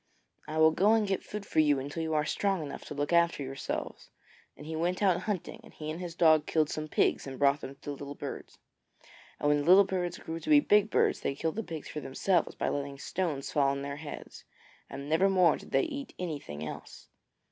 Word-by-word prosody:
I 155 Hz, +1 st, -4 dB
will 160 Hz, 0 st, +6 dB
go 200 Hz, +7 st, +4 dB
and 225 Hz, -2 st, +3 dB
get 195 Hz, -1 st, -1 dB
food 210 Hz, -1 st, -6 dB
for -, -, 0 dB
you 150 Hz, -2 st, +4 dB
until 145 Hz, +5 st, -4 dB
you 160 Hz, -1 st, -1 dB
are 150 Hz, -1 st, +2 dB
strong 195 Hz, +1 st, 0 dB
enough 145 Hz, -, -7 dB
to -, -, -7 dB
look 145 Hz, +3 st, -1 dB
after 170 Hz, -3 st, +3 dB
yourselves,' 135 Hz, 0 st, -5 dB, 0.5 s
and 150 Hz, -, -11 dB
he 160 Hz, +1 st, -5 dB
went 175 Hz, +4 st, -1 dB
out 185 Hz, -3 st, +4 dB
hunting, 195 Hz, -5 st, -3 dB
and -, -, -15 dB
he 155 Hz, 0 st, -5 dB
and 160 Hz, -, -6 dB
his 175 Hz, -2 st, -6 dB
dog 155 Hz, -3 st, +4 dB
killed 155 Hz, -2 st, +1 dB
some 155 Hz, 0 st, -4 dB
pigs 150 Hz, -, +1 dB
and 135 Hz, -1 st, -6 dB
brought 140 Hz, +1 st, +3 dB
them 135 Hz, -, -7 dB
to -, -, -35 dB
the 145 Hz, -, -6 dB
little 140 Hz, 0 st, -7 dB
birds. -, -, -7 dB, 0.8 s
And 145 Hz, -, 0 dB
when 145 Hz, 0 st, +4 dB
the 145 Hz, -, -3 dB
little 185 Hz, +4 st, +8 dB
birds 180 Hz, -3 st, -2 dB
grew 165 Hz, +1 st, -6 dB
to -, -, -7 dB
be 300 Hz, -1 st, +8 dB
big 210 Hz, -6 st, +3 dB
birds, -, -, +2 dB
they 135 Hz, -, -2 dB
killed 160 Hz, +2 st, -2 dB
the 225 Hz, -, -1 dB
pigs 160 Hz, -7 st, -7 dB
for 150 Hz, -, -5 dB
themselves 165 Hz, +6 st, 0 dB
by -, -, -2 dB
letting 140 Hz, -1 st, -3 dB
stones 150 Hz, -2 st, -3 dB
fall 140 Hz, -2 st, +3 dB
on 140 Hz, 0 st, -1 dB
their 140 Hz, 0 st, -5 dB
heads, 150 Hz, -1 st, -9 dB, 0.5 s
and 140 Hz, +1 st, -7 dB
never 165 Hz, +6 st, +3 dB
more 180 Hz, -4 st, +4 dB
did -, -, -11 dB
they -, -, +2 dB
eat 280 Hz, -5 st, -6 dB
anything 145 Hz, -, -5 dB
else. -, -, -9 dB
160 Hz, 235 wpm, -30 LUFS, 145-180 Hz, 0.8 s, little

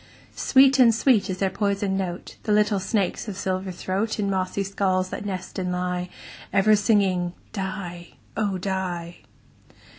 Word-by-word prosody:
Sweet 270 Hz, 0 st, +5 dB
and 230 Hz, -3 st, +6 dB
sweet 230 Hz, -4 st, +3 dB
is 185 Hz, -, -2 dB
their 190 Hz, 0 st, 0 dB
poisoned 200 Hz, -1 st, 0 dB
note, 185 Hz, -2 st, -4 dB
The 215 Hz, -, -2 dB
little 210 Hz, -1 st, +3 dB
snakes' 195 Hz, +1 st, -1 dB
of 200 Hz, -3 st, -5 dB
silver 185 Hz, 0 st, -2 dB
throat, 190 Hz, +5 st, -2 dB
In 200 Hz, -2 st, 0 dB
mossy 190 Hz, +1 st, -1 dB
skulls 190 Hz, -1 st, 0 dB
that 205 Hz, -, -5 dB
nest 185 Hz, -1 st, -5 dB
and 180 Hz, -1 st, -2 dB
lie, 180 Hz, 0 st, -2 dB, 0.4 s
Ever 215 Hz, +2 st, +5 dB
singing 195 Hz, -4 st, +2 dB, 0.2 s
"die, 185 Hz, -4 st, -5 dB, 0.2 s
oh! 205 Hz, -3 st, 0 dB
die." 180 Hz, -2 st, -3 dB
190 Hz, 150 wpm, -24 LUFS, 185-205 Hz, 0.4 s, and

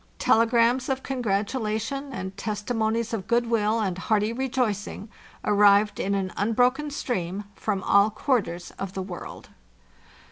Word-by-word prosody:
Telegrams 235 Hz, +3 st, +3 dB
of 265 Hz, 0 st, -1 dB
congratulation, 230 Hz, +3 st, -2 dB
and 190 Hz, -5 st, -5 dB
testimonies 220 Hz, +2 st, -2 dB
of 205 Hz, -3 st, -3 dB
goodwill 230 Hz, -2 st, +2 dB
and 190 Hz, -4 st, -1 dB
hearty 215 Hz, +2 st, +1 dB
rejoicing, 235 Hz, -5 st, -2 dB, 0.4 s
arrived 205 Hz, 0 st, +4 dB
in 200 Hz, +1 st, 0 dB
an 190 Hz, -1 st, -2 dB
unbroken 250 Hz, +8 st, +1 dB
stream 205 Hz, -9 st, -3 dB
from 200 Hz, -1 st, -2 dB
all 200 Hz, +1 st, +5 dB
quarters 205 Hz, -7 st, -1 dB
of 195 Hz, -1 st, -4 dB
the 190 Hz, -, -3 dB
world. 185 Hz, -2 st, -8 dB
215 Hz, 120 wpm, -25 LUFS, 200-240 Hz, 0.4 s, all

